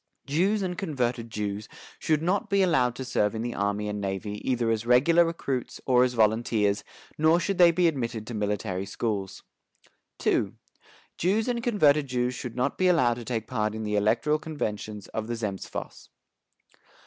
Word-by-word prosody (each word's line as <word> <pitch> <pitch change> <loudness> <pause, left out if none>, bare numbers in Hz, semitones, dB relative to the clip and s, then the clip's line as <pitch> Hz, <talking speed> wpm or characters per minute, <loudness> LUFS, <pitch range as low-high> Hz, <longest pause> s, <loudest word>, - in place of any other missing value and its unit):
Jews 190 +9 +1
and 180 -1 -3
converted 125 -8 -2
Jews 105 0 -4 0.3
should 155 -1 +1
not 185 +4 0
be 200 -1 +3
allowed 130 -9 +2
to 130 - -5
serve 105 -4 0
in 110 - -3
the 120 0 -3
army 100 +1 -1
and 105 0 -3
navy 100 +2 -4
either 120 -3 +1
as 110 0 0
regular 135 +9 +5
recruits 140 -7 -3
or 125 -1 +5
as 125 -1 0
volunteers, 110 -2 +2 0.4
nor 160 +2 +5
should 190 +1 -2
they 175 -1 +8
be 170 +1 +3
admitted 120 -7 -2
to 120 - -7
military 105 -2 -2
schools. 100 -2 -3 0.8
"II. - - +2 0.7
Jews 205 +6 +1
and 240 -1 -1
converted 155 - +3
Jews 125 -1 0
should 125 -2 -6
not 125 +3 -1
be 185 - +4
allowed 155 -10 +4
to 120 0 -8
take 115 -2 -2
part 110 -3 -1
in 110 - -4
the 105 -1 -1
electoral 115 +9 +2
conventions 105 -9 -4
of 110 0 -4
the 120 - -2
Zemstvos. 105 -4 -6
120 Hz, 170 wpm, -27 LUFS, 105-155 Hz, 0.8 s, they